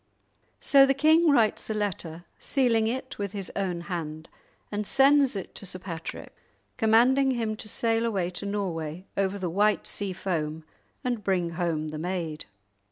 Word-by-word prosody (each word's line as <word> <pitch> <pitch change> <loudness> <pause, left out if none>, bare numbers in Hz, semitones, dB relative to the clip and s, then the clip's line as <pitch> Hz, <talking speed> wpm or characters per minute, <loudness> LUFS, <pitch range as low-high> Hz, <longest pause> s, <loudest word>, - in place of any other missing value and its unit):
So 275 -1 +6
the 270 - +3
king 315 +4 +5
writes 230 -8 +2
a 220 - -1
letter, 175 -5 -3
sealing 235 -5 +2
it 260 +1 -4
with 200 -1 -3
his 195 -3 -5
own 180 -3 -1
hand, 160 -3 -5 0.4
and 205 0 -2
sends 275 -2 +4
it 195 - -5
to - - -7
Sir 185 - -3
Patrick, 170 -3 -7 0.4
commanding 250 +4 +4
him 230 -4 -1
to 215 - -7
sail 225 +1 0
away 190 -5 -1
to 190 +3 -5
Norway 180 -4 -3
over 195 0 0
the 185 -2 -3
white 205 +5 +2
sea 200 -2 -3
foam 160 -4 -3 0.4
and 240 -4 -2
bring 180 -3 0
home 165 -3 -1
the 155 0 -6
maid. 170 -3 -3
200 Hz, 165 wpm, -27 LUFS, 175-230 Hz, 0.4 s, So